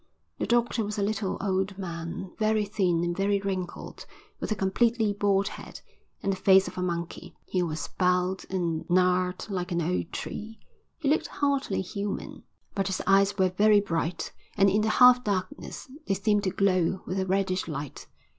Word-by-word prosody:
The - - -1
doctor 235 -1 +2
was 210 +1 -4
a 200 - 0
little, 205 -1 -1
old 190 0 -1
man, 170 0 -5
very 215 -1 +2
thin 180 -5 +1
and 175 0 -1
very 200 +1 +1
wrinkled, 190 -3 -5 0.3
with - - -4
a - - +2
completely 215 +3 +1
bald 200 0 +1
head, - - -10 0.4
and 195 - +1
the - - -5
face 190 0 +5
of - - -7
a 185 - -3
monkey. 170 -2 -4
He 185 - -1
was 160 -2 -2
bowed 180 0 +2
and 170 -4 -1
gnarled 180 0 +2
like 180 -1 -3
an 170 - 0
old 170 0 -1
tree. 220 +1 -6 0.4
He 310 - -3
looked 300 +3 +2
hardly 280 -9 0
human, 200 +1 -5 0.3
but 195 -1 -1
his 190 - -2
eyes 195 +1 +4
were 190 -1 +3
very 205 +3 +5
bright, 170 -3 -2 0.3
and 195 0 +5
in 210 +2 +2
the 220 - +1
half 250 +2 +7
darkness, 185 -4 -3 0.2
they 195 - +2
seemed 205 +1 +1
to - - +2
glow 185 -1 +1
with 190 - -2
a 190 - -1
reddish 185 -1 0
light. 145 -3 -6
195 Hz, 180 wpm, -27 LUFS, 180-205 Hz, 0.4 s, half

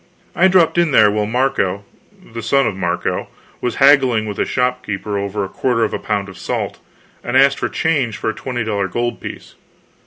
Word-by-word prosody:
I 190 - +5
dropped 180 -2 +3
in 170 -2 +3
there 105 -3 +6
while 105 0 -1
Marco, 110 -5 0 0.5
the 115 - -5
son 135 +4 +2
of 100 - -1
Marco, 90 -2 -2 0.3
was 125 - -2
haggling 135 -5 +4
with 105 -2 -5
a - - +2
shopkeeper 110 -5 -2
over 100 0 -2
a - - -6
quarter 115 +3 0
of 110 - -1
a - - -2
pound 100 -2 -2
of 95 - -11
salt, - - -3 0.4
and 120 +2 0
asked 140 +1 +4
for - - -1
change 140 -9 0
for - - -1
a - - -10
twenty 120 +1 -4
dollar 100 -3 -1
gold 120 +5 -3
piece. - - -8
115 Hz, 195 wpm, -18 LUFS, 100-130 Hz, 0.5 s, there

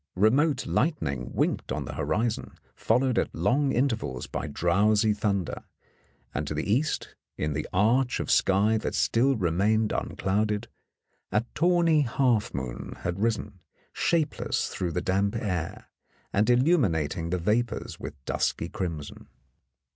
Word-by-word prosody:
Remote 130 - +3
light 155 +3 +1
ning 65 -3 -3
winked - - -1
on - - -2
the - - -6
horizon, 110 +1 -2 0.2
followed 125 +2 +2
at - - -2
long 140 +2 +2
intervals 110 - -1
by - - -4
drowsy 105 +8 +2
thunder, 100 -4 -2 0.7
and 75 +1 -2
to 75 - -3
the 80 - -2
east, 145 +6 -1 0.2
in 75 0 -1
the 75 +1 -3
arch 120 +6 +2
of - - -2
sky 105 +3 +3
that - - -3
still 130 +4 +3
remained 105 +3 +1
unclouded, 105 +2 -1 0.6
a 105 +4 +1
tawny 170 -2 +3
half 120 -4 +1
moon 60 -3 -5
had 85 +2 -3
risen, 105 -3 -1 0.3
shapeless 165 -4 0
through 90 -2 -3
the 90 - -1
damp 100 +4 0
air, 90 -7 -3 0.5
and 105 +2 +2
illuminat 120 - +3
ing 85 0 -4
the 90 - 0
vapours 110 +7 -1
with - - -7
dusky 85 - -1
crimson. 80 -7 -5
105 Hz, 140 wpm, -27 LUFS, 85-125 Hz, 0.7 s, Remote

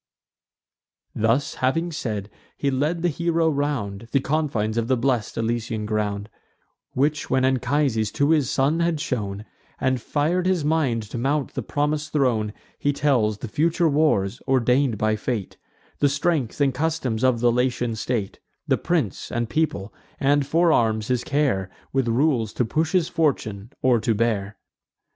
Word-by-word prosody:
Thus 115 +6 +1
having 165 +7 +1
said, 105 -9 -4 0.3
he 140 - 0
led 150 +6 0
the - - +3
hero 165 0 +1
round 120 -8 -2
The 140 - +3
confines 135 -7 -1
of 115 -1 0
the 130 0 +2
blest 120 -3 0
Elysian 115 -1 -2
ground; 105 -1 -2 0.7
Which 150 +3 0
when 130 0 +2
Anchises 130 -3 +1
to 145 +2 +2
his 150 -6 +3
son 145 +5 +1
had 170 -2 +1
shown, 105 -6 -3 0.3
And 130 -2 0
fir'd 165 +8 0
his 180 -5 +1
mind 145 -8 +1
to 105 +3 -6
mount 140 +3 0
the - - -3
promis'd 150 +1 -1
throne, 120 -8 +1 0.3
He 145 - +1
tells 125 -8 +1
the 120 - -6
future 165 - +1
wars, 140 -9 +1
ordain'd 130 -1 +2
by 110 +1 +1
fate; 105 -3 -3 0.4
The 145 - +4
strength 140 -3 0
and 140 -2 +3
customs 135 -6 -1
of 130 -2 +3
the 120 0 +3
Latian 125 -1 0
state; 110 -3 -3 0.3
The - - +2
prince, - - -1
and 120 -1 -2
people; 130 -11 -1 0.3
and 140 0 +2
forearms 120 -10 +2
his 125 -1 +1
care 140 -11 0 0.2
With 135 -2 +1
rules, 120 -2 +1
to 125 - 0
push 155 +8 -1
his 180 -3 +3
fortune, 125 - -1
or 125 -2 +4
to 115 0 0
bear. 105 -2 -1
130 Hz, 155 wpm, -23 LUFS, 110-150 Hz, 0.7 s, The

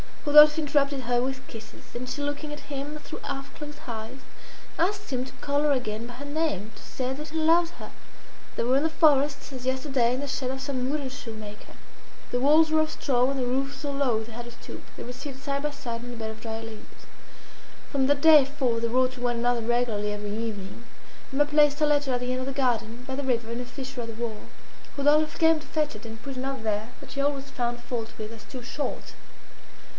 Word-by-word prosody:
Rodolphe 300 +1 +9
interrupted 280 -2 +2
her 245 0 +1
with 265 +1 -3
kisses; 225 -1 -11
and 250 +1 -4
she 290 - -3
looking 290 +1 -3
at 295 0 -10
him 285 +2 -4
through - - -8
half 275 +1 -5
closed 295 0 -8
eyes, 225 +2 -5 0.6
asked 400 +1 0
him 255 -1 0
to 265 - -9
call 285 0 +1
her 300 - +4
again 230 -4 -1
by 245 - -8
her 270 +4 -8
name 285 - -1
to - - -13
say 255 0 -3
that 300 +2 -7
he 320 - -4
loved 330 +2 +4
her - - -9 0.6
They - - 0
were 255 +3 +4
in 280 - +2
the 320 - +2
forest, 290 -3 +3
as 255 -2 -7
yesterday, 260 -2 +1
in - - -3
the 285 - -3
shed 260 -1 -2
of 265 0 -3
some 260 -2 -1
woodenshoe 270 -5 -4
maker. 210 -1 -10 0.6
The 245 - +1
walls 310 +4 +5
were 315 0 +5
of 310 - 0
straw, 250 -2 +2
and 275 -1 -1
the 250 - +1
roof 270 +3 0
so 290 -2 -4
low 260 -6 +1
they 230 - -11
had 235 +1 -6
to 240 - -9
stoop. 235 - -10
They - - -7
were 245 - -6
seated 270 +1 -8
side 280 +1 -2
by 295 - 0
side 240 -5 -5
on 245 0 -6
a - - -8
bed 220 -1 -3
of 220 - -11
dry 225 -1 -4
leaves. 225 -1 -11 0.9
From 270 -2 +2
that 285 0 +3
day 310 -3 +9
forth 260 -5 0
they 230 - +2
wrote 255 +2 +2
to 250 - -10
one 240 -1 +1
another 240 0 +2
regularly 225 -3 +1
every 205 0 -4
evening. 220 -1 -5 0.5
Emma 285 +2 +3
placed 295 0 +4
her 305 - +5
letter 290 -3 +2
at 245 - 0
the 250 0 -1
end 255 - 0
of 255 - -4
the 275 - -2
garden, 240 -3 0
by 265 - -3
the 285 - -2
river, 235 -3 0
in 235 +1 -3
a - - -5
fissure 260 0 -6
of 230 - -5
the 230 - -6
wall. 220 -3 -4 0.5
Rodolphe 300 +2 +4
came 325 -1 +5
to 300 - -13
fetch 300 -5 0
it, 215 +2 -10
and 225 0 -8
put 275 -2 -6
another 265 0 -3
there, 215 0 -1
that - - -11
she 275 +1 -1
always 280 -1 -1
found 240 -2 -2
fault 235 -2 -3
with 215 0 -5
as 225 -2 -10
too 245 +4 -8
short. 285 +4 -4
260 Hz, 235 wpm, -27 LUFS, 235-285 Hz, 0.9 s, Rodolphe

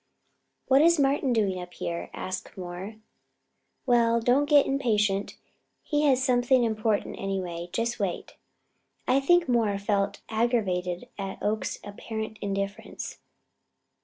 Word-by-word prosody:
"What 270 +1 +5
is 335 0 +5
Martin 275 -1 +2
doing 200 -5 +1
up 180 0 -10
here?" 170 0 -4
asked 185 +1 -6
Moore. 185 +3 -6 0.9
"Well, 235 -2 +4
don't 255 +5 +2
get 290 -2 +6
impatient. 210 -7 0 0.5
He 295 -1 +1
has 265 -2 +3
something 250 0 +3
important, 220 -2 0
anyway. 180 -3 -3
Just 235 +3 -1
wait." 195 -4 -3 0.7
I 260 +2 +4
think 350 +5 +4
Moore 225 -5 +2
felt 200 0 -1
aggravated 205 -6 0
at 195 -1 -4
Oakes's 215 +1 -1
apparent 220 +1 -6
indifference. 200 0 -4
220 Hz, 120 wpm, -27 LUFS, 195-255 Hz, 0.9 s, get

